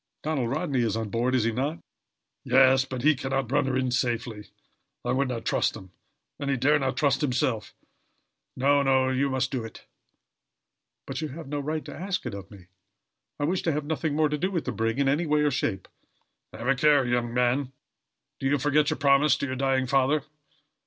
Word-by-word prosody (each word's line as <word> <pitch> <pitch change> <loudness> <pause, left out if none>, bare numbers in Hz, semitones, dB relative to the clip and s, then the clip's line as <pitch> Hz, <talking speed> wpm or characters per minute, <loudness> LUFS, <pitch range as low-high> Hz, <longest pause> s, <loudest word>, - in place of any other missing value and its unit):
"Donald 145 -6 -1
Rodney 140 -2 -1
is 110 -2 0
on 110 -2 -3
board, 120 +4 0
is 125 - +2
he 115 - +1
not?" 140 +8 -2 0.7
"Yes, 130 0 +5
but 130 -2 -6
he 155 +2 +6
can 135 -1 -5
not 135 -3 -1
run 145 -1 +2
her 130 -1 0
in 130 -1 0
safely. 115 -4 -2 0.6
I 120 - 0
would 135 +2 +1
not 120 -3 -4
trust - - +1
him, 95 -4 -11 0.5
and 140 - -3
he 135 - +1
dare 145 +4 +3
not 130 -2 -2
trust 140 -2 +2
himself. 125 -5 -1 0.8
No, 140 +2 +3
no, 130 -1 +3
you 135 +2 +1
must 130 0 -1
do 130 -4 -2
it." 115 - -11 1.2
"But, 135 +2 -5
you 155 - -2
have 150 +2 -9
no 145 +1 -3
right 155 +2 -3
to - - -8
ask 185 -1 -3
it 120 - -4
of 100 -1 -8
me. 100 -4 -14 0.7
I - - -1
wish 175 +5 0
to 165 - 0
have 150 0 -2
nothing 155 -1 -2
more 155 0 +3
to 150 0 -2
do 185 +4 0
with 175 -5 -2
the - - -2
brig, 115 +2 -1
in 140 -1 +1
any 150 +5 +1
way 150 0 +2
or 150 -1 +2
shape." 95 -8 -2 0.6
"Have 120 - -7
a 135 - +5
care, 145 0 +4
young 120 -1 0
man! 125 +2 +1 0.7
Do 135 - -1
you 145 +2 +2
forget 145 +2 +2
your - - -1
promise 140 0 +4
to - - -2
your 130 -1 -3
dying 130 0 +1
father?" 135 +3 +2
135 Hz, 215 wpm, -26 LUFS, 125-145 Hz, 1.2 s, he